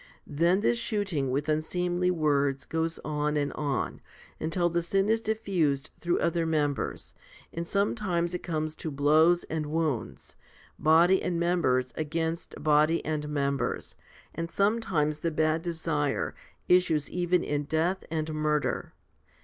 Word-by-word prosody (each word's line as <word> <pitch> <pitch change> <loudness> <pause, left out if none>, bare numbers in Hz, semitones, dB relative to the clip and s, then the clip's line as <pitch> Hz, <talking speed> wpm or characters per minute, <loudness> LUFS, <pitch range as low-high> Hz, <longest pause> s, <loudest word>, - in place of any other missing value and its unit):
Then 170 +6 +2
this 235 +2 +2
shooting 200 - -1
with 140 +4 -1
unseemly 175 +3 0
words 145 -5 +1
goes 165 +1 -1
on 150 0 0
and 145 -1 -1
on, 140 -4 -2 0.4
until 175 +2 0
the 170 0 0
sin 195 +4 +1
is 225 0 +2
diffused 180 -11 0
through 175 0 0
other 170 0 +1
members, 150 -3 -1 0.4
and 170 0 -4
sometimes 190 -4 0
it 180 - -3
comes 155 -2 -3
to 160 - -4
blows 155 +5 +4
and 155 -1 -3
wounds, 155 -5 -3 0.4
body 170 +4 +5
and 175 -2 -1
members 155 -8 +1
against 160 +2 -3
body 155 +2 +3
and 150 -1 -2
members, 140 -2 -1 0.4
and 165 +1 -4
sometimes 185 -8 +1
the 165 - 0
bad 155 0 +1
desire 160 -4 -1 0.3
issues 170 -5 +3
even 180 0 +1
in 145 0 -1
death 165 +5 0
and 155 -1 -2
murder. 150 -1 -1
160 Hz, 135 wpm, -28 LUFS, 150-175 Hz, 0.4 s, body